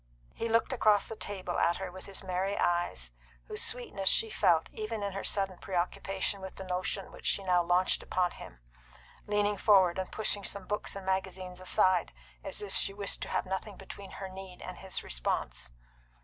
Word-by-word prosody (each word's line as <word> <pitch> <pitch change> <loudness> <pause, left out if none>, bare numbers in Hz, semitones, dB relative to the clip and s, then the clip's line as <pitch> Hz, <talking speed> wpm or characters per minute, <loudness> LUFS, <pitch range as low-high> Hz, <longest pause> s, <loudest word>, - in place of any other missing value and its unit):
He 230 - -2
looked 230 +3 +3
across 215 -4 +4
the 225 - -4
table 190 -4 -3
at 170 - +3
her 190 -2 -4
with 185 +1 -10
his 195 0 -5
merry 190 +2 0
eyes, 175 - +1 0.3
whose - - -2
sweetness 200 -6 +1
she 225 - +3
felt 165 -2 +4
even 215 0 -3
in 200 -1 -2
her 195 - -3
sudden 195 -3 0
preoccupation 190 +2 -1
with 190 0 -7
the 190 - -6
notion 185 +1 -2
which - - -6
she 200 - +2
now 180 -2 +4
launched 175 +2 +3
upon 180 -1 +1
him, - - -11 0.7
leaning 205 0 +2
forward 190 -4 +5
and 185 - -3
pushing 210 -2 -1
some 200 0 -2
books 210 0 -2
and 195 -1 -6
magazines 190 -1 -2
aside, 185 - +3 0.3
as - - -3
if 200 - -6
she 195 - 0
wished 200 -1 0
to - - -3
have - - 0
nothing 190 +2 -3
between 195 0 -9
her 195 - -5
need 190 -1 -9
and 185 - -7
his 190 -1 -4
response. - - -2
190 Hz, 190 wpm, -32 LUFS, 180-200 Hz, 0.7 s, forward